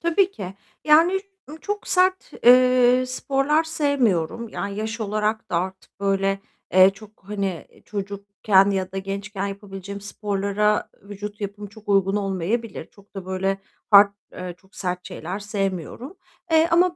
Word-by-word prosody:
Tabii 360 +3 +2
ki. 190 - -7 0.3
Yani, 330 +5 +5 0.3
ı 305 - -8
çok 415 0 -4
sert, 370 +1 +2
eee, 250 0 +6
sporlar 275 +4 +1
sevmiyorum. 245 - 0
Yani, 200 -2 -4
yaş 220 +2 -3
olarak 215 +1 -1
da - - +1
artık 190 +3 -4
böyle, 195 0 +1 0.3
eee, 185 +1 +8
çok, 210 +2 -15
hani, 195 -5 -3 0.2
çocukken 200 -1 +1
ya 190 -2 -1
da 195 - -5
gençken 195 +1 -4
yapabileceğim 200 0 -7
sporlara 205 +1 0
vücut 205 +1 -8
yapım 205 +1 -5
çok 210 +1 -16
uygun 195 0 +3
olmayabilir. 200 0 -2
Çok 200 0 -22
da 190 -2 -6
böyle 190 +1 -1 0.3
hard, 200 0 +8 0.2
eee, 180 -1 -6
çok 190 +2 -25
sert 180 -1 -3
şeyler 180 +5 -5
sevmiyorum. 205 - -4 0.3
Eee, 320 0 +5
ama 350 +1 +4
205 Hz, 140 wpm, -23 LUFS, 195-245 Hz, 0.3 s, eee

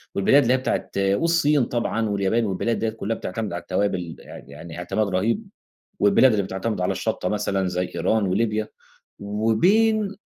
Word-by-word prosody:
والبلاد 135 +9 +5
اللي 125 0 +2
هي 130 - +3
بتاعة 130 - -2
والصين 145 +8 +2
طبعًا 115 -2 -1
واليابان 100 +3 +1
والبلاد 105 +4 -1
ديَّة 115 - 0
كلها 110 0 -3
بتعتمِد 110 -5 -4
على 85 - -4
التوابل 90 -3 -2
يع - - -11
يعني 75 +4 -10
اعتماد 95 +4 -1
رهيب، 115 - -1 0.5
والبلاد 165 -10 +5
اللي 105 -2 +1
بتعتمِد 95 +1 -3
على 90 - +1
الشطّة 90 - -2
مثلًا 100 -2 -1
زي 90 0 -3
إيران 110 -2 +1
وليبيا، 105 +3 0 0.5
وبين 190 - +2
105 Hz, 160 wpm, -23 LUFS, 95-120 Hz, 0.5 s, والبلاد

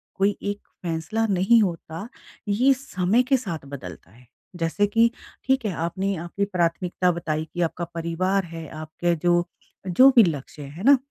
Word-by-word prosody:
कोई 200 +1 +2
एक 205 0 -3 0.2
फैसला 175 +7 -1
नहीं 200 +4 +4
होता 170 0 -3 0.4
ये 245 +7 +4
समय 230 -3 +1
के 265 +1 +3
साथ 170 - -6
बदलता 90 - -9
है। 125 +2 -20 0.3
जैसे 175 +4 +1
कि 230 +2 +4 0.4
ठीक 265 -2 +1
है 210 - 0
आपने 195 +3 -2
आपकी 200 +4 -2
प्राथमिकता 180 -1 0
बताई 160 -2 -2
कि 175 - -2
आपका 170 +1 -1
परिवार 180 +4 0
है 165 -1 -7
आपके 170 +2 -1
जो, 175 +1 +2 0.4
जो 255 +10 +7
भी 235 - +9
लक्ष्य 150 -3 -3
है 145 +7 -9
ना? 275 +3 +7
180 Hz, 160 wpm, -24 LUFS, 165-205 Hz, 0.4 s, भी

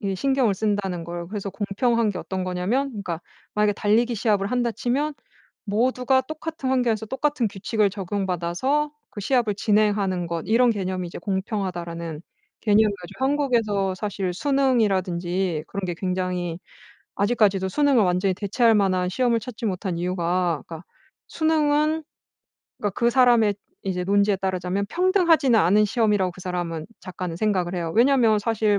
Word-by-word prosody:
이 195 -2 -2
신경을 265 -2 +2
쓴다는 195 -4 -1
거예요. 170 0 -6
그래서 200 0 -4
공평한 220 +3 0
게 200 - -3
어떤 190 -1 -4
거냐면 185 +10 -1
그러니까 200 -9 -5 0.3
만약에 210 0 +3
달리기 230 +4 +2
시합을 205 -2 +1
한다 245 -1 +1
치면 280 +7 -1 0.5
모두가 250 +4 +1
똑같은 310 -1 -5
환경에서 235 -4 +1
똑같은 270 0 0
규칙을 205 +1 0
적용받아서 195 - -1 0.2
그 205 - -7
시합을 230 -1 +1
진행하는 205 -4 +1
것 170 -1 -3
이런 235 +4 +4
개념이 185 -4 -2
이제 - - -8
공평하다라는 175 -5 -4 0.4
개념을 210 -1 +4
가지고 180 +9 -5
한국에서 230 -9 +1
사실 190 -1 -3
수능이라든지 190 - 0
그런 200 - -5
게 175 -1 -2
굉장히 180 -2 -2 0.6
아직까지도 200 -3 +2
수능을 280 -1 +3
완전히 185 +1 +1
대체할 225 +4 +2
만한 185 -3 +2
시험을 235 +3 +1
찾지 230 0 -7
못한 185 -2 -3
이유가 175 -2 0
그러니까 165 0 -8 0.4
수능은 310 0 +1 0.8
그러니까 205 - -1
그 235 -1 +3
사람의 240 -4 +4 0.3
이제 180 -2 -2
논지에 200 +1 +3
따르자면 190 +1 -2
평등하지는 340 - +3
않은 200 +6 +4
시험이라고 210 -3 +1
그 180 - -13
사람은 175 -3 -4
작가는 180 -2 -6
생각을 185 -3 0
해요. 165 -2 -3
왜냐하면 235 -3 +4
사실 215 -1 +1
205 Hz, 390 characters per minute, -24 LUFS, 185-240 Hz, 0.8 s, 이런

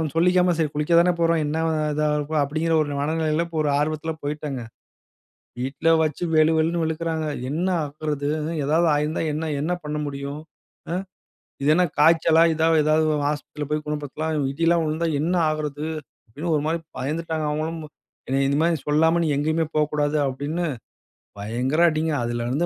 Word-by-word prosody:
சொல்லிக்காம, 180 +1 +3
"சரி, 150 -2 +1
குளிக்க 150 +3 0
தானே 180 0 +3
போறோம். 165 -1 +3
என்ன 150 +2 -2 0.4
இதா 150 0 +1
இருக்கும்?" 150 +1 0
அப்படீன்கிற 160 +3 0
ஒரு 145 -1 -4
மனநிலையில 160 +2 0 0.2
ஒரு 145 - +1
ஆர்வத்தில 155 +1 -1
போய்ட்டேங்க. 145 -3 -3 1.0
வீட்ல 135 +5 -1 0.2
வச்சு 155 +1 -3
வெளு 155 +1 +5
வெளுன்னு 165 +2 +1
வெளுக்குறாங்க. 160 0 -2 0.2
"என்ன 165 +5 -1 0.2
ஆகறது? 145 0 -3 0.4
ஏதாவது 160 +4 +2
ஆயிருந்தா 150 +2 -1
என்ன 155 - -2 0.2
என்ன 160 +5 -1
பண்ண 150 0 -3
முடியும்? 140 +1 -5 0.5
அ. - - 0 0.7
இது 145 - +1
என்ன 180 +1 +4
காய்ச்சலா? 165 +1 +5
இதா 160 +1 +1 0.2
ஏதாவது 155 +1 +3 0.2
ஆஸ்பத்திரியில 150 0 -4
போய் 150 0 -1
குணப்படுத்தலாம் 150 0 -2
இடிலா 165 +3 +2
விழுந்தா 160 +2 -1
என்ன 170 +4 0 0.2
ஆகுறது?" 150 -1 -3 0.4
அப்படின்னு 150 +9 -4
ஒரு 145 - 0
மாதிரி 165 +1 0 0.2
பயந்துட்டாங்க, 155 +3 -2
அவுங்களும். 155 +2 -2 0.7
"இந்த 140 - +1
மாதிரி 170 -1 +2
சொல்லாம, 160 +3 +3
நீ - - 0
எங்கேயுமே 155 +2 +1
போகக்கூடாது" 150 0 +1
அப்படின்னு, 145 +6 -2 0.8
பயங்கர 125 +9 -1
அடிங்க. 155 0 -1
அதலருந்து 120 +2 -2
155 Hz, 145 wpm, -23 LUFS, 145-160 Hz, 1.0 s, வெளு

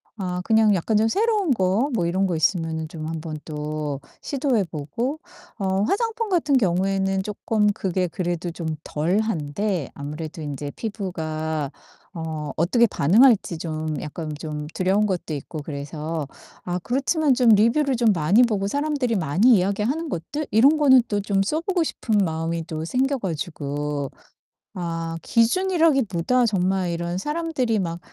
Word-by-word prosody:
아 180 -3 -3
그냥 220 -1 +4
약간 190 +5 0
좀 220 +1 +3
새로운 415 - +1
거 210 +5 +2
뭐 175 -6 +1
이런 185 +3 +1
거 175 - -1
있으면은 160 -1 0
좀 155 -1 -7
한번 160 -1 -5
또 150 -2 -4 0.2
시도해 270 -6 0
보고 175 - -4 0.4
어 190 -2 0
화장품 450 - 0
같은 305 -7 +3
경우에는 195 -1 +1
쪼끔 210 +1 0
그게 185 -2 -1
그래도 175 0 -3
좀 165 0 -6 0.2
덜한데 175 0 -1
아무래도 150 +3 -6
인제 145 0 -5
피부가 160 - -3 0.4
어 160 -3 -4
어떻게 195 +9 +4
반응할지 210 - +4
좀 155 -1 -3
약간 155 +1 -5
좀 150 -2 -5
두려운 195 +3 +2
것도 180 -5 -3
있고 150 +2 -6
그래서 150 +1 -4 0.4
아 180 0 -2
그렇지만 280 +3 +2
좀 250 -2 +3
리뷰를 235 +6 +4
좀 235 -1 +3
많이 180 +8 +4
보고 205 -5 0
사람들이 285 -1 0
많이 190 - +4
이야기하는 210 - 0
것들 285 - -4
이런 265 +9 +5
거는 265 -4 +6
또 205 -2 -1
좀 195 -1 +1
써 300 +11 0
보고 360 0 0
싶은 220 -8 -1
마음이 165 -2 -1
또 160 -1 -4
생겨 265 +8 +1
가지고 150 - -3 0.6
아 165 -2 -3
기준이라기보다 255 - +2
정말 190 -3 0
이런 170 +1 -2
사람들이 295 - -1
막 170 -2 -3
190 Hz, 305 characters per minute, -23 LUFS, 160-240 Hz, 0.6 s, 거는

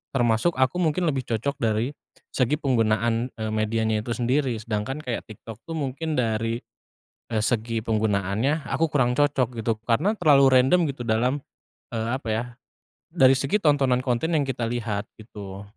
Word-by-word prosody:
termasuk 120 +6 +2
aku 130 +7 +1
mungkin 170 0 +1
lebih 135 -4 -2
cocok 125 +5 -2
dari 115 +3 0 0.4
segi 130 +2 +2
penggunaan, 115 -2 +1
eee, 110 -1 -4
medianya 110 0 0
itu 120 - -2
sendiri. 130 +1 +1
Sedangkan 115 +5 -3
kayak 120 -4 -4
TikTok 110 0 -10
tuh 165 - -4
mungkin 155 +2 -3
dari, 115 -1 0 0.7
eee, 110 -2 +1
segi 115 0 0
penggunaannya 110 - 0
aku 165 - +1
kurang 125 -3 +2
cocok 130 -5 +1
gitu 110 -1 -1
karena 125 - +2
terlalu 145 -5 +6 0.2
random 155 +8 +3
gitu 135 - -11
dalam, 125 +5 +1 0.5
eee, 115 -1 -2
apa 135 - -11
ya, 110 +2 0 0.7
dari 130 0 +5
segi 140 +11 0
tontonan 140 -5 +3
konten 130 +6 -1
yang 150 - +2
kita 130 -3 -2
lihat 115 -3 -2 0.2
gitu. 100 -3 -9
120 Hz, 155 wpm, -24 LUFS, 110-140 Hz, 0.7 s, terlalu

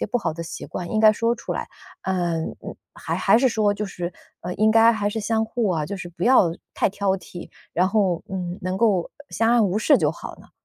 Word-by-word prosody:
些 - - 0
不 230 - -1
好 225 - -2
的 165 +1 -6
习 165 - -7
惯， 175 -1 -6
应 215 - 0
该 215 0 +7
说 230 +2 0
出 - - -5
来？ - - -4 0.3
嗯， 175 -4 -2 0.4
还 - - -4
还 - - +4
是 260 +2 +4
说 210 -2 +1
就 210 - -3
是， 175 -2 -5 0.3
呃， 180 +1 -5
应 215 +1 +3
该， 225 +1 +6
还 205 -2 -1
是 220 - -3
相 220 +1 0
互 225 -1 -1
啊， 160 -5 0
就 200 - -5
是 185 -3 -7
不 175 +1 -10
要 240 -9 +5 0.2
太 - - +2
挑 200 0 -1
剔， 175 -1 -10 0.2
然 180 +2 +3
后， 195 -4 +1
嗯， 180 -2 -4
能 185 +1 -2
够 200 -6 +2 0.2
相 225 +1 +1
安 240 -2 +4
无 190 +3 0
事 285 +7 +4
就 - - +2
好 - - -8
了？ - - -18
200 Hz, 255 characters per minute, -23 LUFS, 180-220 Hz, 0.4 s, 该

